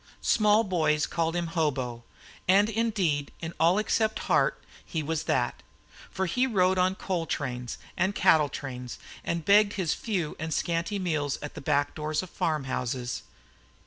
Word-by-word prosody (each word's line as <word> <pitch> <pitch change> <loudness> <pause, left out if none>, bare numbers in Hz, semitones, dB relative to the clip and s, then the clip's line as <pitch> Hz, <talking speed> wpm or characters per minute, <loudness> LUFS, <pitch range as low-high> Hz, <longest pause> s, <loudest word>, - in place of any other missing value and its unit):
Small 215 0 +4
boys 155 -6 +1
called 165 0 -1
him 175 -1 0
"Hobo," 130 -8 -1 0.4
and 200 +4 +5
indeed 200 -11 0
in 165 0 -5
all 170 +4 +4
except 215 +1 +1
heart - - +2 0.2
he 160 -2 -3
was 160 +1 -2
that. - - 0 0.5
For 190 - -2
he 250 +9 +1
rode 185 -5 +2
on 185 +1 +2
coal 175 -4 -2
trains 125 -4 -3 0.2
and 195 +1 0
cattle 150 -3 +4
trains, 125 -4 -6 0.3
and 170 -2 -2
begged 205 +2 +5
his 180 -6 0
few 190 - -2
and 160 +1 -4
scanty 170 +4 -1
meals 155 -7 -1
at 145 - -6
the - - -8
back 145 0 +1
doors 155 +2 -2
of 185 - -10
farm 155 -3 -1
houses. 125 -1 -3
165 Hz, 160 wpm, -28 LUFS, 145-190 Hz, 0.5 s, and